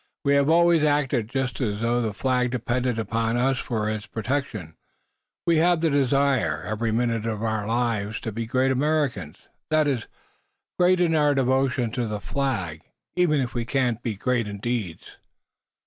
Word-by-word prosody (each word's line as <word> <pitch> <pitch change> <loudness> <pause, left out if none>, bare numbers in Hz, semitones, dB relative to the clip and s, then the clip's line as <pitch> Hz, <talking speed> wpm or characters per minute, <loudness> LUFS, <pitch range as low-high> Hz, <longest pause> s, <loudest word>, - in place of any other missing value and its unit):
We 140 - +4
have 140 +1 +3
always 170 0 +5
acted 140 -6 +1
just 135 0 -2
as 105 -3 -1
though 120 +1 +1
the 110 -2 -1
Flag 125 +3 0
depended 125 0 -1
upon 115 +1 -1
us 130 +1 +1
for 110 -3 -2
its 110 -1 -3
protection. 115 - -3 0.7
We 170 -2 +3
have 170 0 +3
the 165 -2 +2
desire, 135 - +1
every 110 +1 -2
minute 115 -1 0
of 110 -1 -3
our 110 -2 -1
lives, 115 -3 -1
to 110 - -4
be 115 +2 -4
great 130 +3 +2
Americans 130 - -1 0.2
that 155 -1 +3
is, 130 -6 -1 0.7
great 180 0 +4
in 170 -2 +3
our 150 -2 +3
devotion 130 -2 +1
to 120 0 -2
the 105 -1 -3
Flag, 100 - -2 0.3
even 155 -5 +3
if 125 - -3
we 120 - -1
cannot 120 -2 0
be 115 -3 -3
great 120 +1 0
in 100 0 -6
deeds." 105 -6 -4
125 Hz, 170 wpm, -24 LUFS, 110-140 Hz, 0.7 s, always